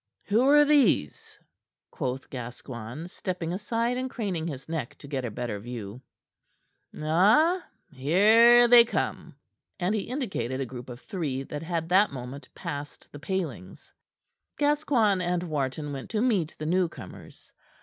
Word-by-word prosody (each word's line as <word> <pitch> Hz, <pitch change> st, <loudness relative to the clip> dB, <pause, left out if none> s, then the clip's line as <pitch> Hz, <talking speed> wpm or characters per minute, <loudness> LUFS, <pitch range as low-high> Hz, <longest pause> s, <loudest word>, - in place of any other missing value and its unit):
"Who 215 Hz, +4 st, +2 dB
are 295 Hz, +1 st, +7 dB
these?" 275 Hz, -, +2 dB, 0.5 s
quoth 130 Hz, +1 st, -4 dB
Gascoigne, 120 Hz, +2 st, -7 dB
stepping 180 Hz, -2 st, -4 dB
aside 230 Hz, +5 st, -1 dB
and 260 Hz, 0 st, -3 dB
craning 190 Hz, -10 st, -3 dB
his 135 Hz, -5 st, -7 dB
neck 160 Hz, -7 st, -4 dB
to 140 Hz, -, -12 dB
get 135 Hz, -3 st, -3 dB
a -, -, -2 dB
better 110 Hz, -1 st, -4 dB
view. 115 Hz, 0 st, -7 dB, 1.0 s
"Ah! 215 Hz, -, +3 dB, 0.3 s
Here 220 Hz, -, +6 dB
they 240 Hz, 0 st, +9 dB
come." 230 Hz, -, -3 dB, 0.4 s
And 180 Hz, +3 st, 0 dB
he 210 Hz, -3 st, -2 dB
indicated 190 Hz, -, -3 dB
a 135 Hz, -, -1 dB
group 125 Hz, 0 st, -9 dB
of 120 Hz, +1 st, -9 dB
three 150 Hz, -10 st, -3 dB
that 145 Hz, +2 st, -6 dB
had 165 Hz, -1 st, -3 dB
that 195 Hz, +4 st, +4 dB
moment 130 Hz, +1 st, -8 dB
passed 145 Hz, 0 st, -7 dB
the 145 Hz, -, -10 dB
palings. 155 Hz, -, -5 dB, 0.6 s
Gascoigne 280 Hz, -10 st, +2 dB
and 175 Hz, 0 st, -1 dB
Wharton 145 Hz, -2 st, -3 dB
went 135 Hz, -1 st, -7 dB
to 215 Hz, -1 st, -1 dB
meet 195 Hz, -11 st, 0 dB
the 155 Hz, -, -5 dB
newcomers. 165 Hz, -, -4 dB
165 Hz, 140 wpm, -27 LUFS, 130-215 Hz, 1.0 s, they